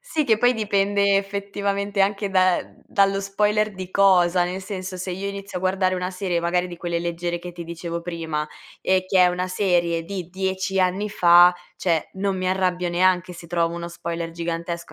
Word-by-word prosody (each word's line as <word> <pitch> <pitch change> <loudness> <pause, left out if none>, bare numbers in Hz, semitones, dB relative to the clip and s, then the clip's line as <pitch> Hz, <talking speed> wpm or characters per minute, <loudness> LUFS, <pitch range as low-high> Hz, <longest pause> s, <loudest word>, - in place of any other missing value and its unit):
Sì, 320 -11 -1
che 220 -5 +3
poi 245 +2 +4
dipende 200 -2 +2
effettivamente 200 0 -2
anche 200 +1 +1
da 185 -1 +4
ehm, - - -15
dallo 195 0 +2
spoiler 210 +1 0
di 185 -1 -7
cosa. 180 -2 +4
Nel 185 +2 -4
senso, 185 -2 -6
se 185 +1 -5
io 195 +2 -4
inizio 200 -1 -6
a - - -10
guardare 185 0 +1
una 180 0 -3
serie 180 -2 -2
magari 175 +1 0
di 175 - -8
quelle 170 -1 -2
leggere 175 0 -3
che 175 +1 -8
ti 170 0 -8
dicevo 170 0 -5
prima 160 -3 -4 0.3
e 185 0 +1
che 190 - +2
è 180 - +7
una 180 +1 -1
serie 175 -3 +1
di 180 -1 -6
10 190 0 -1
anni 190 +3 0
fa, 175 -2 +7 0.2
cioè 165 -4 0
non 195 0 -1
mi 185 0 -1
arrabbio 180 -1 0
neanche 180 +1 +2
se 170 - -11
trovo 170 -1 0
uno 170 0 -5
spoiler 170 -1 -5
gigantesco, 170 0 -5
185 Hz, 195 wpm, -23 LUFS, 175-195 Hz, 0.3 s, è